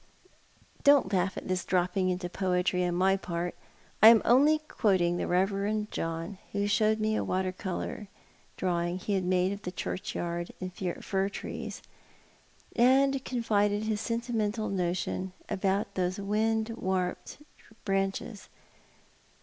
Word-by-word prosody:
Don't 280 Hz, -9 st, +5 dB
laugh 190 Hz, +1 st, +1 dB
at -, -, -6 dB
this 185 Hz, -1 st, -1 dB
dropping 185 Hz, +1 st, +1 dB
into 180 Hz, 0 st, -2 dB
poetry 180 Hz, 0 st, 0 dB
on 175 Hz, -1 st, -1 dB
my 190 Hz, +2 st, +3 dB
part. 175 Hz, -2 st, -3 dB, 0.5 s
I 215 Hz, -, +10 dB
am 230 Hz, -1 st, +8 dB
only 285 Hz, +6 st, +5 dB
quoting 190 Hz, -, +1 dB
the -, -, -1 dB
Eeverend 200 Hz, +3 st, 0 dB
John, 165 Hz, +4 st, -4 dB
who 200 Hz, 0 st, 0 dB
showed 215 Hz, +1 st, +2 dB
me 215 Hz, 0 st, +1 dB
a -, -, 0 dB
water 185 Hz, 0 st, -1 dB
colour 190 Hz, +2 st, -5 dB, 0.5 s
drawing 175 Hz, -1 st, -1 dB
he 200 Hz, +2 st, -3 dB
bad 190 Hz, -2 st, 0 dB
made 185 Hz, +1 st, +2 dB
of 200 Hz, 0 st, -5 dB
the 180 Hz, -, -5 dB
churchyard 175 Hz, -2 st, -4 dB
and 185 Hz, -1 st, -5 dB
fir 190 Hz, +2 st, -2 dB
trees, -, -, -6 dB, 0.9 s
and 265 Hz, +2 st, +4 dB
con 245 Hz, -2 st, -3 dB
fided 205 Hz, -1 st, +2 dB
his 215 Hz, -1 st, -1 dB
sentimental 230 Hz, -2 st, -1 dB
notion 185 Hz, 0 st, -2 dB, 0.2 s
about 195 Hz, +1 st, 0 dB
these 185 Hz, 0 st, -1 dB
wind 220 Hz, +2 st, 0 dB
warped 190 Hz, -5 st, -2 dB, 0.5 s
branches. 195 Hz, +2 st, -2 dB
195 Hz, 135 wpm, -29 LUFS, 180-215 Hz, 0.9 s, I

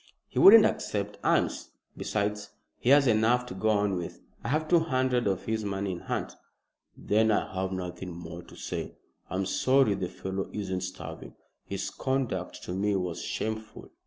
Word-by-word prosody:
"He -, -, -3 dB
wouldn't 215 Hz, +2 st, +10 dB
accept 105 Hz, 0 st, -2 dB
alms. -, -, +1 dB, 0.3 s
Besides, 105 Hz, 0 st, -2 dB, 0.3 s
he 120 Hz, -, 0 dB
has 140 Hz, 0 st, +7 dB
enough 120 Hz, +1 st, +3 dB
to 125 Hz, -, -7 dB
go 95 Hz, +4 st, 0 dB
on 105 Hz, -3 st, +2 dB
with. 85 Hz, -, -6 dB, 0.2 s
I -, -, -4 dB
have 155 Hz, +5 st, 0 dB
two 170 Hz, +1 st, +5 dB
hundred 130 Hz, -6 st, +1 dB
of 95 Hz, -2 st, 0 dB
his 110 Hz, -1 st, -2 dB
money 100 Hz, -1 st, -2 dB
in 90 Hz, -, -5 dB
hand." -, -, -3 dB, 0.6 s
"Then 110 Hz, +2 st, +2 dB
I 105 Hz, -, +1 dB
have 95 Hz, 0 st, -2 dB
nothing 90 Hz, 0 st, -5 dB
more 85 Hz, 0 st, -8 dB
to -, -, -15 dB
say. -, -, -5 dB, 0.3 s
I'm 95 Hz, +1 st, -1 dB
sorry 130 Hz, +3 st, +3 dB
the 95 Hz, -2 st, -3 dB
fellow 95 Hz, +1 st, -4 dB
isn't 95 Hz, -3 st, -3 dB
starving. 95 Hz, +1 st, -7 dB, 0.3 s
His 100 Hz, 0 st, -4 dB
conduct 130 Hz, -9 st, -2 dB
to 90 Hz, -, -5 dB
me 100 Hz, +2 st, +1 dB
was 90 Hz, -3 st, -2 dB
shameful." 110 Hz, 0 st, -4 dB
105 Hz, 170 wpm, -28 LUFS, 95-120 Hz, 0.6 s, wouldn't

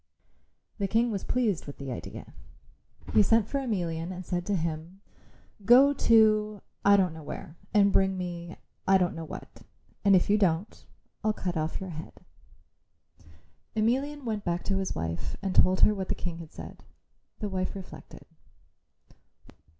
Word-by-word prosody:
The 200 Hz, -, 0 dB
King 230 Hz, +4 st, +2 dB
was 200 Hz, -3 st, -3 dB
pleased 220 Hz, -11 st, 0 dB
with 145 Hz, -, -8 dB
the 135 Hz, -2 st, -6 dB
idea. 120 Hz, -, -8 dB, 0.8 s
He -, -, +6 dB
sent 220 Hz, +1 st, +3 dB
for 280 Hz, -, -1 dB
Emelian 175 Hz, -9 st, -2 dB
and 185 Hz, 0 st, -7 dB
said 175 Hz, 0 st, -3 dB
to 205 Hz, -, +1 dB
him, 165 Hz, +2 st, -4 dB, 0.6 s
"Go 260 Hz, +6 st, +7 dB
to 215 Hz, -4 st, +3 dB, 0.2 s
I 200 Hz, 0 st, +6 dB
don't 185 Hz, -4 st, +2 dB
know 160 Hz, -, -9 dB
where, 155 Hz, +1 st, -8 dB, 0.2 s
and 200 Hz, -1 st, +4 dB
bring 190 Hz, 0 st, +3 dB
me 175 Hz, -1 st, -5 dB, 0.3 s
I 195 Hz, 0 st, +6 dB
don't 180 Hz, -1 st, +1 dB
know 165 Hz, 0 st, -6 dB
what. -, -, -10 dB, 0.4 s
And 200 Hz, -1 st, +6 dB
if 180 Hz, -, +3 dB
you 210 Hz, +1 st, +3 dB
don't, 185 Hz, +1 st, 0 dB, 0.4 s
I'll 215 Hz, -, +2 dB
cut 180 Hz, -4 st, -3 dB
off 155 Hz, 0 st, -2 dB
your 190 Hz, -2 st, -6 dB
head." 155 Hz, 0 st, -8 dB, 1.6 s
Emelian 265 Hz, +6 st, 0 dB
went 215 Hz, -3 st, -2 dB
back 175 Hz, 0 st, -1 dB
to 195 Hz, -, 0 dB
his 190 Hz, -, -2 dB
wife 80 Hz, 0 st, -4 dB
and 195 Hz, -2 st, -2 dB
told 185 Hz, 0 st, +4 dB
her 210 Hz, -, +6 dB
what 190 Hz, -2 st, -4 dB
the -, -, 0 dB
King 170 Hz, -2 st, -5 dB
had 160 Hz, -2 st, -10 dB
said. -, -, -10 dB, 0.5 s
The 210 Hz, -, -4 dB
wife 185 Hz, 0 st, -2 dB
reflected. 190 Hz, -2 st, -10 dB
190 Hz, 165 wpm, -28 LUFS, 170-215 Hz, 1.6 s, Go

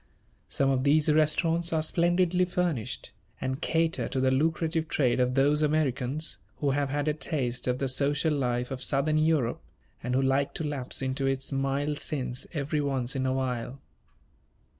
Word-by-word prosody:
Some 135 Hz, -1 st, +1 dB
of 130 Hz, -1 st, +1 dB
these 150 Hz, +2 st, +4 dB
restaurants 165 Hz, +2 st, +2 dB
are 160 Hz, -1 st, +1 dB
splendidly 175 Hz, +2 st, +2 dB
furnished, 175 Hz, -, -2 dB, 0.3 s
and 130 Hz, +1 st, -3 dB
cater 165 Hz, 0 st, +1 dB
to 135 Hz, -, -2 dB
the 130 Hz, 0 st, +3 dB
lucrative 160 Hz, +3 st, 0 dB
trade 130 Hz, -5 st, +1 dB
of 125 Hz, 0 st, +1 dB
those 145 Hz, +2 st, +3 dB
Americans 145 Hz, -4 st, 0 dB, 0.2 s
who 140 Hz, -2 st, 0 dB
have 140 Hz, 0 st, 0 dB
had 145 Hz, +2 st, -1 dB
a 150 Hz, -, +2 dB
taste 130 Hz, -5 st, -2 dB
of 125 Hz, 0 st, +1 dB
the 135 Hz, -, -1 dB
social 145 Hz, +4 st, +1 dB
life 125 Hz, -3 st, -1 dB
of 130 Hz, -1 st, -5 dB
Southern 150 Hz, +4 st, +1 dB
Europe 155 Hz, -7 st, +1 dB, 0.4 s
and 125 Hz, +1 st, -2 dB
who 135 Hz, -, +3 dB
like 135 Hz, +1 st, +1 dB
to -, -, -2 dB
lapse 140 Hz, -3 st, -3 dB
into 135 Hz, +1 st, -1 dB
its 135 Hz, +1 st, -1 dB
mild 140 Hz, +2 st, -1 dB
sins 130 Hz, -4 st, -3 dB
every 150 Hz, -1 st, -1 dB
once 135 Hz, -2 st, -1 dB
in 130 Hz, -1 st, 0 dB
a 130 Hz, -, +1 dB
while. 130 Hz, 0 st, -3 dB
140 Hz, 170 wpm, -28 LUFS, 130-155 Hz, 0.4 s, these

